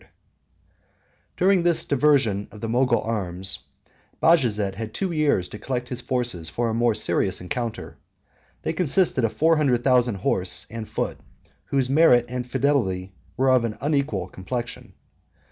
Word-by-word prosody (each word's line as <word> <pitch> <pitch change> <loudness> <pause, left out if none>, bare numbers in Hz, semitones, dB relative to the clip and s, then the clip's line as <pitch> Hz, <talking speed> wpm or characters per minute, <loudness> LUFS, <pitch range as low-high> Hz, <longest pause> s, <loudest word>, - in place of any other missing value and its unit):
] - - -41
During 185 0 +4
this 170 -1 +1
diversion 130 -8 +2
of 105 - -12
the 115 - -4
Mogul 120 +1 +2
arms, 95 -4 -2 0.6
Bajazet 110 - +3
had 110 +2 -7
two 190 -2 -2
years 150 - +1
to 105 - -9
collect 125 -2 -3
his 125 -1 -4
forces 120 -11 -2
for 115 +8 -1
a - - -1
more 115 -1 +2
serious - - 0
encounter. 115 +5 -5 0.7
They - - -1
consisted 165 -4 +1
of 115 - +1
four 160 +1 +3
hundred 130 -5 +2
thousand 125 -4 +3
horse 95 -1 -1
and 115 -1 -6
foot, - - -3 0.3
39 - - -33
whose 135 -2 0
merit 135 -5 +5
and 125 0 -4
fidelity 115 -9 0 0.2
were 130 +1 +3
of 130 -2 +4
an 110 -2 -3
unequal 140 - -1
complexion. 120 +7 -6
120 Hz, 155 wpm, -24 LUFS, 105-140 Hz, 0.7 s, merit